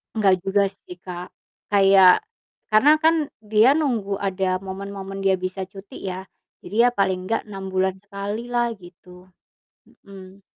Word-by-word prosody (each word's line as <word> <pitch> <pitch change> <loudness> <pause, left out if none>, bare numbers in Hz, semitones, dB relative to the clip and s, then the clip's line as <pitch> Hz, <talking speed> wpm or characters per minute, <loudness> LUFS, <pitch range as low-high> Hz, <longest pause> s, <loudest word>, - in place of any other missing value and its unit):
Enggak 200 -4 +4
juga 200 +1 +2
sih 190 -2 -12
Kak, 180 0 -8 0.4
kayak 195 -2 +6 0.5
karena 240 +8 +6
kan 325 +1 +5 0.3
dia 215 +4 +4
nunggu 235 -10 -1
ada 190 -1 -1
momen-momen 195 0 -7
dia 195 -1 +3
bisa 185 +1 -4
cuti 195 0 -11
ya, 185 0 -4 0.4
jadi 200 - -8
ya - - +4
paling 190 -2 +2
nggak 225 - -2
6 195 -1 -6
bulan 190 0 0
sekali 205 +2 -5
lah 240 -1 +1
gitu. 180 0 -16 0.8
Mhm. 195 0 -13
195 Hz, 140 wpm, -22 LUFS, 185-205 Hz, 0.8 s, kayak